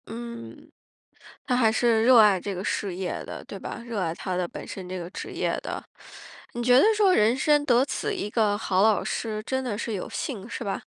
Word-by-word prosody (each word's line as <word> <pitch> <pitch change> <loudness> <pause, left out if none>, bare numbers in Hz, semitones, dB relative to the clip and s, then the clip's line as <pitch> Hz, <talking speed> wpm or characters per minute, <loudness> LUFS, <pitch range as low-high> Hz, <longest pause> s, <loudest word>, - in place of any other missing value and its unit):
嗯， 235 +1 -9 0.8
他 250 - +1
还 230 -3 +4
是 230 -1 +2
热 250 0 +7
爱 205 -4 +6
这 200 +1 -4
个 180 - -5
事 195 -4 -2
业 185 0 -4
的， - - -8
对 - - -8
吧？ - - -7
热 230 -4 -3
爱 165 -3 -1
他 185 +1 -4
的 180 -1 0
本 - - -8
身 185 -2 -7
这 185 0 -4
个 170 -1 -6
职 - - -7
业 - - -1
的。 - - -5 0.7
你 240 - -3
觉 245 +1 +5
得 - - +6
说， 400 -3 +4
人 225 -1 +3
生 295 +2 +3
得 245 -1 +4
此 425 +8 -3
一 365 - -3
个 210 -2 +1
好 190 -3 +1
老 215 -1 +4
师， 215 -2 -3
真 260 +2 -2
的 215 -5 -3
是 230 -1 -3
有 190 - -4
幸， 225 -6 -5
是 240 - -5
吧？ 200 - -3
225 Hz, 240 characters per minute, -26 LUFS, 195-245 Hz, 0.8 s, 热